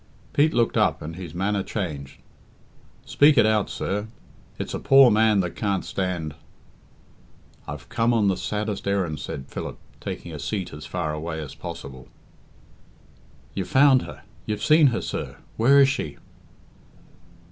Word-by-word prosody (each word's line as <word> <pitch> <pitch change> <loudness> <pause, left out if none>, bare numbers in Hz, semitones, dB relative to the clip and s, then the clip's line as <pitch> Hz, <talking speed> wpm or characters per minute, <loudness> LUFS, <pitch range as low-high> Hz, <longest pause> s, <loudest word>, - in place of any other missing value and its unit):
Pete 150 +2 +4
looked 115 -1 +2
up - - +2
and 80 +2 -6
his 85 -3 -8
manner 100 +2 0
changed. 75 -10 -5 0.8
"Speak 145 0 +4
it 115 - +6
out, 110 -2 +2
sir. 105 +2 -3 0.5
It's - - -5
a - - -2
poor 135 -2 +7
man 110 -1 +4
that 90 -2 -3
can't 100 -3 -1
stand 90 -5 -3 0.7
" - - -30
"I've 75 -2 -7
come 115 0 +1
on 110 -4 +3
the 95 - +2
saddest 105 +1 -3
errand," 90 -7 0
said 70 -1 -6
Philip, - - -6 0.2
taking 85 - -6
a 75 - -6
seat 95 +6 -3
as 75 0 -8
far 85 -4 -2
away 80 +1 -4
as 75 -4 -7
possible. 70 -7 -8 1.5
"You've 95 -2 -3
found 135 -1 +6
her - - -10 0.2
you've 105 -1 -3
seen 155 -1 +6
her, 120 -3 0
sir. - - -5 0.2
Where 135 +5 +5
is 135 -1 +6
she?" 105 - -3
100 Hz, 155 wpm, -24 LUFS, 80-115 Hz, 1.5 s, poor